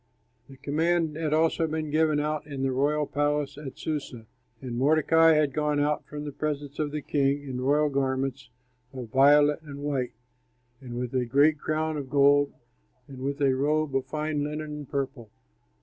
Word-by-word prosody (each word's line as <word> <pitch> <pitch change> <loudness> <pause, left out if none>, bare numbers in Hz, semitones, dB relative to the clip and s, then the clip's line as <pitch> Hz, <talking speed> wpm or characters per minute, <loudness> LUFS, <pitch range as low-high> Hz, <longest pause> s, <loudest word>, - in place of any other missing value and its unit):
The 135 - -13
command 160 +2 0
had 155 -1 -2
also 160 +1 +2
been 155 -1 -3
given 155 -1 +2
out 150 0 -2
in 140 -2 -5
the 135 - +1
royal 145 +3 +1
palace 145 0 -1
at 145 -2 -9
Susa; 140 -7 -5 0.3
and 125 -3 -6
Mordecai 160 +4 +4
had 150 -3 +2
gone 150 0 0
out 150 +1 0
from 150 0 -7
the 145 - -4
presence 145 0 -4
of 150 -1 0
the 150 -1 -4
king 140 0 0
in 130 -3 -5
royal 145 +3 +3
garments 135 -1 -2 0.4
of 125 -4 -7
violet 145 +3 +5
and 145 -3 -10
white 135 -4 -2 0.7
and 120 -2 -7
with 125 0 -4
a 130 -1 +1
great 140 +5 +3
crown 155 +1 -1
of 140 -3 -6
gold 145 0 +4 0.6
and 135 -2 -11
with 140 +2 -3
a 135 -1 +4
robe 150 +1 0
of 135 -1 0
fine 150 -1 -2
linen 150 +1 -4
and 150 -2 -7
purple. 135 -5 -4
145 Hz, 180 wpm, -27 LUFS, 135-150 Hz, 0.7 s, violet